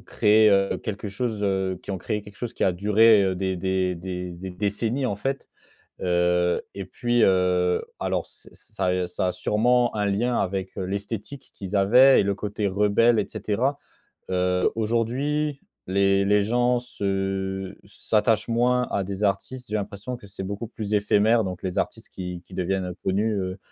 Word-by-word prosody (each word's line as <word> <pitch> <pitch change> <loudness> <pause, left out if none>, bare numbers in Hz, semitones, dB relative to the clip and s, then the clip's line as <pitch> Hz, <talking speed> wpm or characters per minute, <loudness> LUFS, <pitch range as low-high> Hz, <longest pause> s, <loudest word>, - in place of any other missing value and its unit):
créé, 110 +1 +4
heu, 100 0 +2
quelque 105 0 -5
chose, 110 0 -3
heu, 95 -2 0
qui - - -7
ont 95 - -3
créé 105 +3 -3
quelque 105 -1 -14
chose 120 -1 -5
qui - - -5
a 95 - +4
duré, 105 +3 +5
heu, 95 -1 0
des 95 0 -2
des 95 0 0
des 90 0 -5
des 90 +2 -7
décennies 110 +7 -1
en 105 -5 -1
fait. 135 +5 -3 0.5
Heu, 90 0 +2
et 100 -2 -6
puis, 120 +4 0
heu, 90 -1 +2 0.2
alors - - -1
c'est - - -17
ça 95 - -5
a 90 0 +1
ça 90 +1 -2
a - - +1
sûrement 120 +6 +1
un 105 -1 0
lien 120 +5 0
avec, 95 0 -2
heu, 95 - -3
l'esthétique 105 +7 -6
qu'ils 95 +1 -6
avaient 125 +8 +6
et - - +3
le 100 0 0
côté 105 0 -3
rebelle 105 +4 +3
et - - -1
cetera. 115 +7 -1 0.5
Heu, 90 0 +1
aujourd'hui, 135 +7 -1 0.3
les 100 0 +3
les 105 +1 +3
gens 120 +3 +2
se 95 -3 -3
s'attachent 105 +2 0
moins 125 +1 +2
à 100 - 0
des 100 +1 -5
artistes. 120 +5 -2
J'ai 105 - -5
l'impression 105 +4 -5
que 120 - -14
c'est 95 0 -8
beaucoup 100 +4 -4
plus 110 -3 -4
éphémère, 105 +2 +3
donc 90 -1 -5
les 90 -1 -3
artistes - - -3
qui 90 -1 -6
qui 95 - -13
deviennent, 95 +1 -1
heu, 90 - -5
connus, 105 +4 +1
heu, 95 0 -3
100 Hz, 180 wpm, -24 LUFS, 95-115 Hz, 0.5 s, avaient